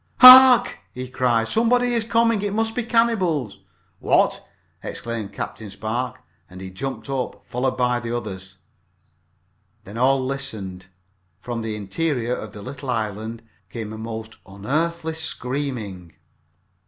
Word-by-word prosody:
"Hark!" 255 -1 +10 0.2
he 130 0 -5
cried. 120 -3 +1
"Somebody 245 - +2
is 230 -2 +1
coming! 230 -1 +2
It 205 0 -2
must 225 0 0
be 245 - -1
the 235 - -9
cannibals!" 185 - +1 0.4
"What!" - - +2 0.4
exclaimed 115 -3 -5
Captain 110 -2 -6
Spark, 125 +5 -4 0.3
and 90 0 -11
he 95 0 -8
jumped 135 +10 -5
up, 135 -2 -4
followed 130 +1 -2
by 125 -1 +1
the 120 0 -3
others. 95 -4 -8 1.3
Then 105 +4 -8
all 130 +1 +3
listened. 110 -9 -6 0.5
From 120 -1 -5
the 110 -1 -4
interior 125 +4 -2
of 110 - -7
the 105 - -10
little 135 +2 -8
island 110 0 -3 0.3
came 110 -2 -6
a - - -7
most 110 0 -7
unearthly 160 +12 -2
screaming. 125 - -5
125 Hz, 135 wpm, -22 LUFS, 110-160 Hz, 1.3 s, Hark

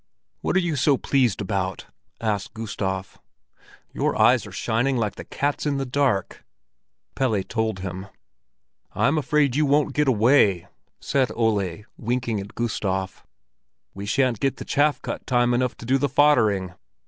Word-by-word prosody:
"What - - -2
are - - +5
you 175 -4 -1
so 140 0 +3
pleased 125 -9 +1
about?" 95 -1 -2 0.3
asked 105 -3 -2
Gustav. 95 -4 -4 0.7
"Your - - -1
eyes - - +4
are - - -10
shining 125 +4 0
like 105 -3 -1
the - - -9
cat's 145 +1 -2
in 140 -1 0
the 135 - -2
dark." 125 -7 -1 0.7
Pelle 110 -7 0
told 110 -2 -2
him. 95 0 -6 0.9
"I'm 155 - +2
afraid 150 -3 +1
you 150 0 +2
won't 145 0 +2
get 150 +1 +1
away!" 110 -6 +4 0.3
said 135 -2 0
Ole, 105 -5 0
winking 120 -1 -1
at 100 +1 -9
Gustav. 95 -5 -2 0.7
"We 100 +1 -7
shan't 125 -1 +1
get 135 -1 0
the - - -7
chaff 145 +1 +1
cut - - -5
time 120 -1 +2
enough 125 0 0
to - - -10
do 135 +3 +2
the 145 +1 0
foddering. 110 -10 +3
120 Hz, 155 wpm, -24 LUFS, 100-140 Hz, 0.9 s, are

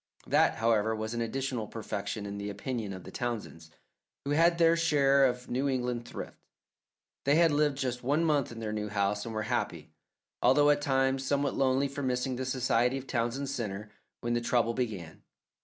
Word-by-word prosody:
That, - - +3
however, 110 -1 +2
was 110 +1 -4
an 120 - -2
additional 125 -1 -2
perfection 105 -1 -4
in 100 0 -5
the 100 0 -4
opinion 105 +1 -4
of 95 -2 -7
the - - -10
Townsends, 110 -9 -5 0.6
who 140 - -2
had 165 +3 +4
their 165 -1 +5
share 140 -4 +4
of 125 -1 -1
New 135 +3 0
England 125 -2 -2
thrift. - - -7 0.9
They 140 +2 +4
had 165 -1 +5
lived 145 -1 +2
just 125 -2 -2
one 145 +6 +1
month 145 -6 +1
in 115 - -8
their 110 -1 -3
new 105 0 -3
house, 105 0 0
and 110 - -5
were 110 - -1
happy, 120 +3 -2 0.5
although 145 0 +5
at 145 0 +1
times 135 -2 +1
somewhat 140 0 0
lonely 135 +1 +2
from 140 0 -4
missing 125 +1 -1
the 130 +1 -3
society 125 0 +1
of 135 - -7
Townsend 125 +2 -1
Centre, 105 -5 -4 0.3
when 120 0 -1
the 120 - +1
trouble 115 -1 +1
began. 100 -10 -4
125 Hz, 190 wpm, -30 LUFS, 110-140 Hz, 0.9 s, their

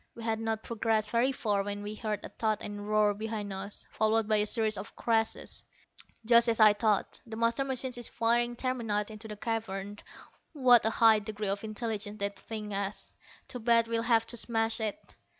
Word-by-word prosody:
We 230 - -9
had 225 -1 -1
not 225 -1 -2
progressed 220 -2 -1
very 240 +3 +2
far 210 -6 0
when 205 +1 -4
we 210 +1 -5
heard 215 -2 -4
a - - -7
thud 215 -2 -1
and 205 0 -5
a - - -7
roar 210 0 +2
behind 210 -1 -4
us, 195 +2 -7
followed 220 0 +1
by 215 -1 +3
a 210 0 +2
series 220 -1 0
of 200 - -8
crashes. 225 -1 -1 0.6
"Just 235 +1 +6
as 230 - +1
I 215 -1 +8
thought. 210 -1 0
The 225 - -7
master 230 +4 +1
machine 260 -1 -2
is 240 -1 -3
firing 240 +1 +1
terminite 225 -5 -2
into 215 +1 -9
the 210 -1 -7
cavern. 205 -2 -4 0.5
What 245 -6 +6
a - - +4
high 225 -1 +5
degree 210 -1 -4
of 200 +1 -2
intelligence 215 -1 -3
that 200 -1 -3
thing 215 -2 -6
has! 200 0 -2 0.3
Too 250 - -6
bad 230 0 +3
we'll 230 0 0
have 230 -1 +3
to 235 - -4
smash 225 0 0
it." 220 +8 -4
220 Hz, 200 wpm, -30 LUFS, 210-230 Hz, 0.6 s, I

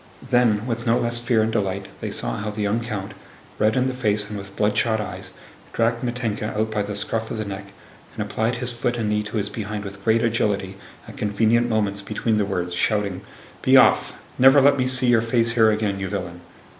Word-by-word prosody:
Then 115 -3 +3
with 120 0 -3
no 115 +1 +4
less 120 0 -1
fear 120 -2 +2
and 110 - 0
delight 100 -2 -2
they - - -4
saw - - -3
how 105 0 -3
the 105 0 -3
young 105 +3 +1
count, 105 -4 -5 0.5
red 110 +1 +3
in 130 - +2
the 130 - -1
face 105 -5 0
and 105 - -6
with 100 -1 -8
bloodshot 110 +2 +1
eyes, 95 -2 -6 0.4
dragged 115 +1 +1
Mítenka 115 -4 -3
out 110 +1 0
by 105 -1 0
the 105 0 -4
scruff 110 +2 -3
of - - -4
the 110 - -3
neck 100 0 -6 0.5
and - - -2
applied 115 +2 -1
his 125 0 -3
foot 120 0 -2
and 110 -2 -1
knee 105 0 +1
to 105 +2 -5
his 100 -1 -1
behind 105 -1 -5
with 100 0 -9
great 115 +1 +3
agility 105 -4 0 0.3
at - - -11
convenient 110 +3 +2
moments 105 -3 0
between 110 +2 -1
the 105 - +1
words, 90 -3 -2
shouting, 100 0 0 0.4
"Be - - +6
off! - - +4 0.2
Never 135 +3 +7
let 140 +1 +5
me 130 -2 0
see 130 0 +2
your 120 -2 +4
face 115 0 +1
here 115 -2 +4
again, 105 -2 0
you 95 -1 -3
villain!" 90 -3 -5
110 Hz, 220 wpm, -23 LUFS, 100-115 Hz, 0.5 s, Never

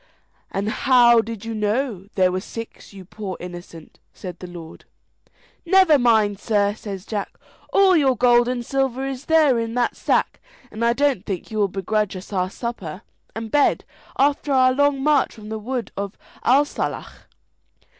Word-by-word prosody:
"And 200 +2 -3
how 240 -1 +5
did 225 -1 -8
you 230 - -4
know 210 -1 -2
there 185 -1 +3
were 185 - -1
six, 230 +2 -9
you 195 -2 -12
poor 195 0 -7
innocent?" 175 -2 -10
said 180 -3 -9
the 180 - -8
lord. 170 -2 -11 0.8
"Never 350 -4 +5
mind, 220 -5 +3
sir," 205 -2 +1
says 200 -3 -8
Jack, 205 -3 -5 0.3
"all 385 -2 +5
your 270 -6 +3
gold 240 -1 +4
and 245 -1 -2
silver 270 0 -1
is 270 0 -6
there 310 -7 +4
in 230 0 -3
that 245 -1 0
sack, - - 0 0.3
and 220 +2 -4
I 235 0 +3
don't 275 -6 +1
think 190 0 -5
you 215 - -3
will 205 - +3
begrudge 200 +2 -2
us 185 +3 -9
our 185 -1 0
supper 195 -5 -6 0.3
and 225 -1 -6
bed 290 -1 +2 0.3
after 285 +1 +1
our 255 -1 +4
long 285 0 +1
march 295 -2 +2
from 215 -2 -11
the 220 0 -4
wood 245 +2 -4
of 200 0 -5 0.3
Athsalach." 285 +4 0
230 Hz, 165 wpm, -22 LUFS, 200-265 Hz, 0.8 s, how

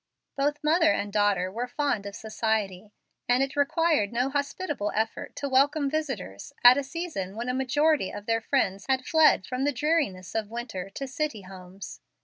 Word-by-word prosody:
Both 290 +2 -1
mother 320 +1 +4
and 205 -7 -2
daughter 200 -3 +2
were 235 +5 -3
fond 250 -7 -1
of 200 - -7
society, 215 -3 -2 0.4
and 250 +2 +4
it 270 - -4
required 290 -5 +2
no 250 +3 0
hospitable 285 - -2
effort 220 +1 -2
to 285 - -3
welcome 280 +2 +2
visitors 265 - -4
at 245 +1 +10
a - - -2
season 270 - -5
when 235 +3 -4
a - - 0
majority 280 -2 +2
of 205 0 -8
their 225 0 +1
friends 200 -6 0
had 260 -1 +1
fled 315 -11 +4
from 255 +1 -3
the 290 - +2
dreariness 280 - -1
of 220 -2 -2
winter 225 -5 -5
to 270 +7 -6
city 265 -5 -3
homes. 185 +1 -10
250 Hz, 175 wpm, -27 LUFS, 205-290 Hz, 0.4 s, at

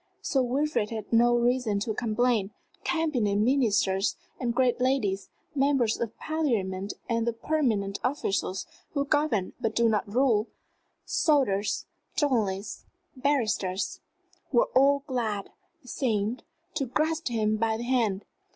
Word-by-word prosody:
Sir 270 - +2
Wilfrid 260 -2 0
had 220 -1 -6
no 240 +1 +5
reason 240 -3 +1
to 220 +1 -1
complain. 225 -2 +1 0.3
Cabinet 285 -12 +1
ministers 210 -4 +2 0.2
and 245 -2 0
great 250 -1 +2
ladies, 230 -7 +1 0.2
members 270 -5 +2
of 230 -1 -3
Parliament 205 -12 -1
and 230 -1 0
the 235 - +1
permanent 230 -7 0
officials 200 -7 -1 0.3
who 280 0 +1
govern 285 -10 +1
but 225 -1 -1
do 235 0 +4
not 210 -2 0
rule, 235 -3 +3 0.6
soldiers, 225 -10 +1 0.3
journalists, 215 -9 0 0.3
barristers 230 -9 0 0.5
were - - +3
all 280 +1 +4
glad, 225 -7 -2 0.3
it 250 - -13
seemed, 225 -2 -1 0.3
to 280 -4 -1
grasp 315 +5 0
him 215 -3 +1
by 220 0 +1
the 235 - -5
hand. 230 -6 0
235 Hz, 125 wpm, -28 LUFS, 210-270 Hz, 0.6 s, no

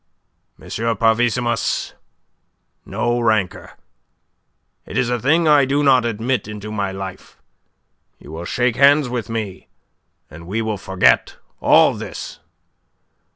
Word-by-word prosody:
"M. - - -14 0.3
Parvissimus, 120 +1 0 0.9
no 120 0 -1
rancour. 110 -5 -1 1.1
It - - -5
is 125 -1 +1
a 120 - 0
thing 160 +7 +2
I 150 -2 +5
do 140 +2 0
not 130 -4 +4
admit 115 0 -2
into 105 0 -7
my 100 -2 -2
life. 95 -1 -8 0.8
You 75 - -14
will 85 +2 -7
shake 125 +4 0
hands 140 0 +5
with 120 -4 -4
me, 110 -5 -5 0.6
and 80 +3 -13
we 105 +5 -2
will 110 -3 -2
forget 90 -10 +2 0.2
all - - +5
this." - - -8
115 Hz, 120 wpm, -19 LUFS, 100-125 Hz, 1.1 s, I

